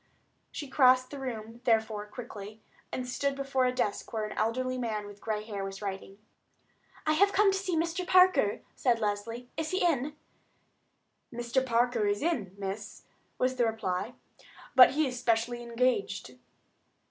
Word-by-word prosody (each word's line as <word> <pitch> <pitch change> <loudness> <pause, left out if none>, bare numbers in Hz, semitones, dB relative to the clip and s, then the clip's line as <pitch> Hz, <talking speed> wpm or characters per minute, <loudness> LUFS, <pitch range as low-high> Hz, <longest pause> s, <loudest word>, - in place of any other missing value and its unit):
She 290 - -6
crossed 255 -1 +4
the 285 - -6
room, 230 -3 -6
therefore, 220 -3 +1
quickly, 215 -2 -9 0.3
and 255 -1 -3
stood 280 +2 -1
before 275 -1 0
a 250 - +2
desk 245 -5 -2
where 220 -2 -2
an 210 - -6
elderly 255 +4 -1
man 215 -4 -2
with 205 0 -12
gray 215 -1 -2
hair 205 -3 -5
was 195 0 -6
writing. 195 -1 -6 0.9
"I 310 - +3
have 400 +5 +4
come 410 0 +5
to 390 - 0
see 370 -4 -1
Mr. 340 +3 -1
Parker," 365 - +5
said 245 -3 +2
Leslie; 225 +3 -3
"is 320 -1 -2
he 370 +1 +1
in?" 295 -3 +1 1.2
"Mr. 240 +2 0
Parker 240 -3 +2
is 205 +4 0
in, 225 - -1
miss," 200 +1 -6 0.3
was 255 0 0
the 240 - +3
reply; 190 -5 -2 0.6
"but 260 0 +8
he 310 +2 +2
is 250 -2 -3
specially 240 0 0
engaged." 235 - -1
240 Hz, 160 wpm, -30 LUFS, 210-270 Hz, 1.2 s, but